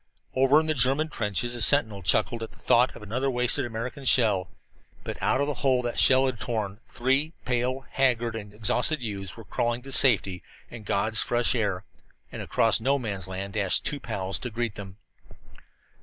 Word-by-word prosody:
Over 135 +3 +4
in 160 - -2
the 155 - 0
German 135 +4 +1
trenches 115 0 -2
a 120 - -2
sentinel 110 -4 +5
chuckled 110 +5 +1
at 115 - -5
the - - -18
thought 125 +2 +2
of - - -11
another 125 +6 -2
wasted 125 +1 0
American 120 +4 -6
shell, 105 -7 +2 0.5
but - - -7
out - - +2
of 140 - +1
the 145 - -2
hole 130 -3 +2
that 120 - -2
that - - -3
shell 130 0 +5
had 130 -4 -3
torn 105 -3 -4
three 135 +5 0
pale, 125 +2 -1
haggard, 120 -4 0
and 105 -2 -7
exhausted 125 +8 0
youths 100 -3 -5
were 115 - -10
crawling 120 0 -2
to 135 - -10
safety 100 -9 +4 0.3
and 115 -3 -10
God's 110 +2 0
fresh 120 0 +1
air. 100 -6 -1 0.5
And - - -7
across 115 -1 +2
No 135 +4 +2
Man's 100 -8 -3
Land 95 +1 -6
dashed 100 -4 +1
two 145 - -1
pals 95 -6 -3
to 125 - -5
greet 115 -1 -3
them. 100 -2 -10
120 Hz, 190 wpm, -26 LUFS, 105-130 Hz, 0.5 s, sentinel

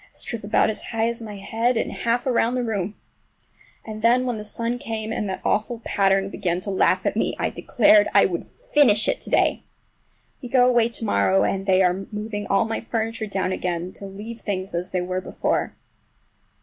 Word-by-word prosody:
A - - -15
strip 230 -3 -5
about 210 +1 +2
as 215 - -6
high 225 -1 -1
as 235 0 -5
my 215 -2 -7
head 225 +5 0
and - - -1
half 235 +1 -1
around 245 -1 +1
the 250 - 0
room. 205 -3 -2 0.9
And 215 -1 -7
then 245 +3 +4
when 245 -3 -1
the - - -6
sun 230 +3 -3
came 225 -4 -4
and 210 -4 -2
that 190 - -4
awful 220 +3 0
pattern 195 0 +2
began 175 0 -1
to 200 - -4
laugh 190 - +2
at - - 0
me - - 0
I - - -1
declared 310 +1 +4
I - - +6
would - - -2
finish 290 - +2
it - - 0
to - - -8
day! - - +2 0.8
We 250 - -7
go 250 0 +5
away 240 -2 +3
to 230 -1 -3
morrow, 95 - +3
and 195 0 -1
they 190 0 +4
are 185 +2 0
moving 210 -1 -4
all 195 +3 +2
my 225 0 -3
furniture 225 -1 -3
down 190 -2 -1
again 180 -1 -3
to 200 - -8
leave 215 +4 -8
things 190 -2 -3
as 175 +1 -3
they 185 - -1
were 185 +1 -2
before. - - -2
215 Hz, 205 wpm, -23 LUFS, 195-235 Hz, 0.9 s, I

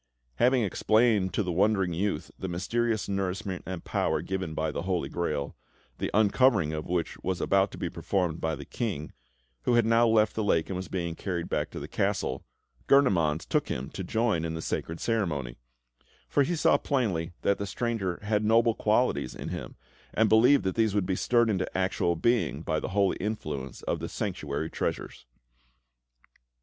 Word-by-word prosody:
Having 125 - +4
explained 110 -1 +2
to - - +1
the 90 - -2
wondering 95 0 +2
youth 100 +5 -2
the 95 - -3
mysterious 110 +5 -1
nourishment 95 -1 -2
and 95 -2 -5
power - - 0
given 95 -5 -3
by 80 0 -1
the - - -3
Holy 90 -1 -1
Grail, 75 -5 -2 0.4
the - - -1
uncovering 105 - +3
of 75 -1 -4
which 85 -1 -2
was 95 -2 -2
about 95 0 +2
to - - -10
be - - -2
performed 90 -4 -1
by 80 -1 0
the - - -9
King, 95 -10 -4 0.5
who 120 - +2
had 120 -2 +4
now 115 +1 +4
left 110 -1 +3
the 110 - -1
lake 85 -6 +1
and 95 - -3
was 95 +1 -4
being 85 -3 -3
carried 85 -1 -4
back - - -1
to - - -7
the - - -6
castle, 65 - -1 0.4
Gurnemanz 85 - +3
took - - 0
him 65 +2 -4
to 95 - -5
join 110 -3 0
in 80 0 -3
the 80 - -4
sacred 80 +1 -3
ceremony; 80 - -1 0.7
for 145 - +2
he 170 +6 +1
saw 155 - +3
plainly 95 - -1
that 100 - +2
the 100 - -3
stranger 100 -4 -2
had 105 0 +1
noble 115 +2 +4
qualities 105 - +1
in - - -6
him, - - -6 0.4
and 110 - +4
believed 125 +6 +5
that 95 - 0
these 110 -3 +1
would 100 -3 +2
be 95 - 0
stirred 120 +4 +3
into 95 -4 -1
actual 95 -2 +1
being 120 +7 +1
by - - 0
the - - -4
holy 100 0 +2
influence 75 - -4
of - - -1
the - - -5
Sanctuary 80 -6 -3
treasures. - - -4
95 Hz, 185 wpm, -28 LUFS, 85-110 Hz, 0.7 s, believed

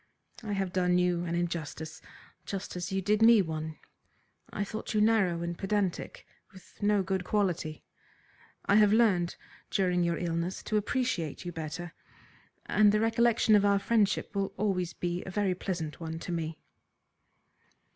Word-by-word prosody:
I 215 -3 -4
have 195 -2 -2
done 180 -1 +2
you 180 -1 +1
an 170 0 -2
injustice 160 -2 -4 0.5
just 195 -2 -5
as 175 +1 -4
you 190 0 -1
did 210 +2 +2
me 230 0 +8
one. 155 -1 -5 0.7
I 205 - -2
thought 215 +2 -5
you - - +3
narrow 205 -6 +3
and 170 0 -3
pedantic, 195 -1 -2 0.3
with 190 +2 -17
no 205 -1 +3
good 190 0 -1
quality. 175 -6 -1 0.8
I 200 - +4
have 210 -1 +6
learned 205 -6 +3 0.3
during 180 -2 +1
your 170 -1 0
illness 170 +1 -2
to 215 - 0
appreciate 210 - -1
you 175 - -3
better, 165 +1 -6 0.7
and 210 -1 +4
the 210 - +2
recollection 225 0 +3
of 205 - +4
our 200 0 +4
friendship 205 0 +1
will 195 -1 -2
always 185 -4 -1
be 175 0 -3
a - - -7
very 195 0 0
pleasant 175 -4 -4
one 160 -1 -5
to 170 - -6
me." 165 -2 -3
185 Hz, 155 wpm, -30 LUFS, 170-205 Hz, 0.8 s, me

